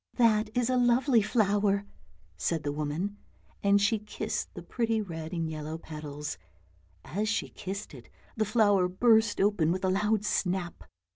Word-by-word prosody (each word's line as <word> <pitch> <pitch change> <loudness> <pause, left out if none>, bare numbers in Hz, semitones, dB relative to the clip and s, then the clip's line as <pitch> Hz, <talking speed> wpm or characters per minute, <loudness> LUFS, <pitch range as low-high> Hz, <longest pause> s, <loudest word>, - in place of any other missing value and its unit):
" - - -35
That 220 -3 +3
is 245 -2 +2
a 255 - +2
lovely 245 0 +4
flower," 205 -2 +2 0.5
said 150 - -1
the 145 - -1
woman, 155 +8 -3 0.4
and 200 0 +4
she 210 +2 +2
kissed 210 0 -4
the - - -7
pretty 230 -2 0
red 165 -6 -5
and 165 -2 -2
yellow 155 0 -5
petals; 150 -2 -7 0.7
as 210 +5 -2
she 225 - -1
kissed 195 -1 -6
it 125 -4 -12 0.3
the 220 - +1
flower 205 -4 +3
burst 220 +3 +3
open 195 -5 +3
with 185 +2 -1
a - - +2
loud 210 +2 +1
snap. 180 -3 -1
200 Hz, 160 wpm, -29 LUFS, 165-215 Hz, 0.7 s, lovely